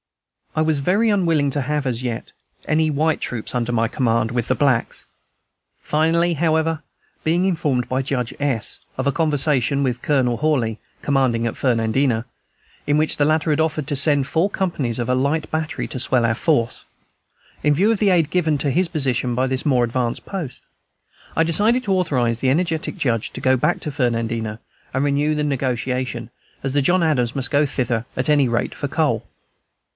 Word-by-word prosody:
I 155 - +2
was 155 -2 +1
very 200 +10 +2
unwilling 165 -8 +2
to 145 - 0
have, 150 +1 -1
as 125 -1 -1
yet, 120 -2 -4 0.3
any 155 0 +2
white 155 +2 +1
troops 120 0 -3
under 120 -1 0
my 115 -1 +1
command, 115 -2 0
with 120 -2 -1
the 130 - +3
blacks. 130 -5 0 0.7
Finally, 165 +3 +1
however, 160 0 +1 0.4
being 170 +3 +2
informed 150 -9 0
by 130 +1 0
Judge 130 -3 -2
S. 135 -7 -1 0.2
of 130 - -2
a - - +3
conversation 145 -4 +1
with 125 -3 -1
Colonel 130 -5 +1
Hawley, 125 -7 0 0.2
commanding 130 -5 +1
at 115 - -4
Fernandina, 115 0 +1 0.6
in 145 +1 +3
which 155 0 +2
the 145 - +1
latter 155 +1 +2
had 150 +1 +2
offered 155 -3 -1
to 150 - -1
send 145 -1 +3
four 165 +7 +1
companies 150 - -2
and 120 - -2
a 125 - +2
light 140 +5 0
battery 160 -1 -2
to 130 - -5
swell 125 -1 +2
our 110 -1 +1
force, 130 -5 0 0.8
in 150 - +4
view 200 +8 +3
of 220 - 0
the 205 - +3
aid 170 -5 +3
given 160 -4 +1
to 140 0 0
his 180 +5 +2
position 130 -6 0
by 130 +2 +1
this 130 +2 -2
more 125 -4 +3
advanced 120 0 -2
post, 170 -10 -6 0.7
I 165 - +5
decided 210 +10 +2
to 195 - +1
authorize 125 -11 +1
the 130 - +1
energetic 160 +2 0
Judge 115 -5 0
to - - -6
go 130 0 +3
back 125 - +1
to 150 - -3
Fernandina 115 -4 -1 0.3
and 130 +2 0
renew 145 +2 +1
the 150 - -1
negotiation, 125 -3 -2 0.3
as 135 -1 -2
the 145 - +3
John 175 +6 +3
Adams 125 -7 +1
must 135 -2 0
go 145 0 +3
thither 120 -4 -1
at 130 - 0
any 145 -4 +4
rate 120 0 -1
for - - -3
coal. - - 0
140 Hz, 185 wpm, -21 LUFS, 125-155 Hz, 0.8 s, I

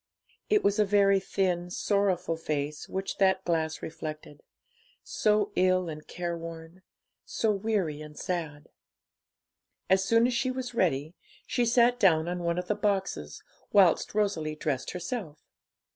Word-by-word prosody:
It 420 -1 +3
was 205 +2 +2
a - - +6
very 200 -1 +4
thin, 180 -2 -1
sorrowful 195 -3 0
face 150 -2 -4
which 190 +1 -4
that 190 -1 +3
glass 160 -2 -1
reflected; 155 -2 -7 0.6
so 210 -1 +1
ill 185 -1 +2
and 155 -1 -8
careworn, 165 0 -6 0.4
so 220 - 0
weary 195 -7 -1
and 150 -1 -11
sad. 160 -6 -4 1.2
As 190 0 +5
soon 230 +4 +4
as 250 - +1
she 245 +2 0
was 255 -1 -4
ready, 155 -7 0 0.3
she 245 - 0
sat 240 +1 +4
down 165 -6 +4
on 175 0 -2
one 170 0 -1
of 180 0 -3
the 210 - +2
boxes, 200 -2 -2 0.3
whilst 195 -1 +4
Rosalie 165 -8 0
dressed 140 -4 -2
herself. 180 -3 -5
185 Hz, 140 wpm, -28 LUFS, 160-205 Hz, 1.2 s, a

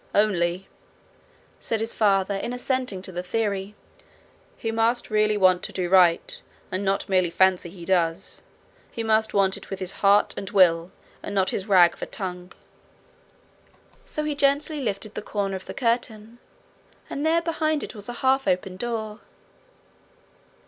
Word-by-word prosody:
'Only,' 185 -3 +1 0.9
said 225 - -2
his 225 +1 -2
father, 200 -2 +2
in 200 +5 -3
assenting 250 -6 -2
to 190 - -7
the 180 0 -4
theory, 200 +1 -2 0.8
'he 225 - -3
must 225 +1 0
really 215 0 +2
want 185 -2 +4
to - - -6
do 180 -2 -2
right, 180 -3 +3 0.3
and 185 +2 -2
not 195 0 0
merely 185 -2 +2
fancy 185 0 +2
he 170 -1 -11
does. 175 0 -1 0.5
He 230 - -5
must 220 -1 +1
want 195 -1 +3
it - - -13
with 195 - -5
his 185 -1 -4
heart 200 +1 +4
and 195 - -6
will, 175 -4 +4 0.3
and 205 - -6
not 190 -1 +2
with - - -1
his 190 - -12
rag 180 -4 +6
of - - -18
a - - -3
tongue.' 180 -2 -6 1.5
So 305 - -4
he 300 0 -1
gently 285 +1 +1
lifted 215 -2 -3
the - - -5
corner 200 -2 -2
of 190 - -8
the - - -7
curtain, 230 -2 -2 0.7
and 285 - -4
there 330 +2 +2
behind 315 -2 0
it - - -6
was 205 0 -7
a - - -4
half 265 -1 +3
open 185 0 0
door. 220 -1 -4
200 Hz, 165 wpm, -24 LUFS, 185-230 Hz, 1.5 s, rag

